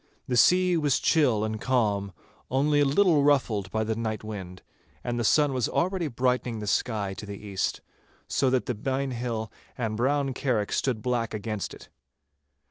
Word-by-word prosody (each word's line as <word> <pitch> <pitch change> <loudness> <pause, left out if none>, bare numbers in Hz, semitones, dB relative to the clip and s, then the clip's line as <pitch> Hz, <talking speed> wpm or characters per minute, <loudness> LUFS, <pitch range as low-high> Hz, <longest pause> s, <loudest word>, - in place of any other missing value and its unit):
The 125 - 0
sea 180 +7 +5
was 145 -4 +2
chill 130 -10 +3
and 110 0 -3
calm, 105 -6 +1 0.4
only 145 +3 +2
a 145 - +4
little 155 +2 +4
ruffled 120 -9 +2
by 110 +3 -1
the 110 0 -1
night 110 -1 -3
wind, 95 -4 -7 0.4
and 120 0 -2
the - - 0
sun 145 +4 +3
was 125 -3 0
already 180 -1 0
brightening 125 -2 0
the 105 - -5
sky 105 -1 0
to 105 - -8
the 100 -1 -6
east, 100 -2 -3 0.5
so 90 - +1
that 130 -1 +1
the 125 - -1
Byne 135 +4 -2
Hill 115 -3 -3 0.3
and 110 -3 -2
Brown 135 +3 +1
Carrick 120 -6 -1
stood 120 -5 -1
black 120 -3 -1
against 105 -2 -4
it. - - -15
120 Hz, 175 wpm, -27 LUFS, 110-135 Hz, 0.5 s, sea